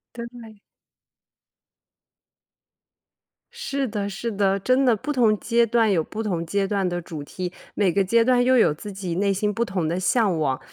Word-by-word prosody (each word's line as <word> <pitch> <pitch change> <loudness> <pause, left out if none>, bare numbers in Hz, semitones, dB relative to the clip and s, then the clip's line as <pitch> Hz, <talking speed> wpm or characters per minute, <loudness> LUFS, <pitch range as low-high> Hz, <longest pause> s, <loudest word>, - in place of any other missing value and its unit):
对。 235 -3 -10 2.9
是 280 - -3
的 205 -2 -3
是 225 +4 -4
的， 195 -1 +1
真 255 +6 +2
的， 240 -3 +4
不 295 +8 -4
同 225 -5 +3
阶 235 +1 +2
段 230 -1 +2
有 170 -5 +2
不 215 +7 -6
同 175 -6 -2
阶 195 +3 -1
段 195 -2 0
的 175 0 -2
主 160 -3 -7
题， 180 +4 -6 0.2
每 195 -3 +2
个 195 - +2
阶 230 +5 +3
段 245 0 +3
又 255 0 +4
有 155 - +4
自 205 +7 -9
己 190 -3 -5
内 200 +2 +1
心 210 +2 -1
不 230 - 0
同 185 -7 -2
的 175 +3 -1
向 185 -1 +2
往。 135 -4 0
205 Hz, 190 characters per minute, -23 LUFS, 185-235 Hz, 2.9 s, 的